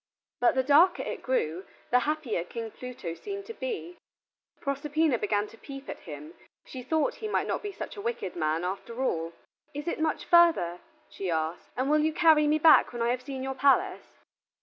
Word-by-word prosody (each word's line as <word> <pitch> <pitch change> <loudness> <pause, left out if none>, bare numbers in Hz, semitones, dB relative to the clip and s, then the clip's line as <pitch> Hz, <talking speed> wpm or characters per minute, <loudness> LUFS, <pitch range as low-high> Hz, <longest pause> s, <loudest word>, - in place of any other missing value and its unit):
But 245 - +3
the 260 - +2
darker 330 +7 +5
it - - -5
grew, 185 -9 -1 0.3
the 250 - +6
happier 290 - -1
King 225 +4 -6
Pluto 245 -10 -7
seemed 400 - -7
to 455 - -7
be. 420 -8 -5 0.6
Proserpina 285 -1 0
began 205 0 0
to 225 - -16
peep 275 -1 -9
at - - -6
him, 150 0 -9 0.3
she 260 - -8
thought 315 +4 0
he 435 - -4
might 425 - 0
not - - -2
be 415 - -5
such - - -7
a - - -5
wicked 450 - -3
man 160 0 0
after 215 +7 -4
all. 165 -8 -1 0.4
"Is 290 +3 -5
it 335 - -2
much 315 -1 -1
further," 330 - +4 0.3
she 190 - -5
asked, 160 0 -2
"and 260 +1 0
will 305 +1 +4
you 310 +1 +1
carry 310 -2 +5
me 305 +1 +3
back 310 +1 +6
when 240 -1 -3
I 235 - +1
have 250 +1 0
seen 265 0 -6
your 265 0 -2
palace?" 275 +1 +1
265 Hz, 195 wpm, -28 LUFS, 205-315 Hz, 0.6 s, the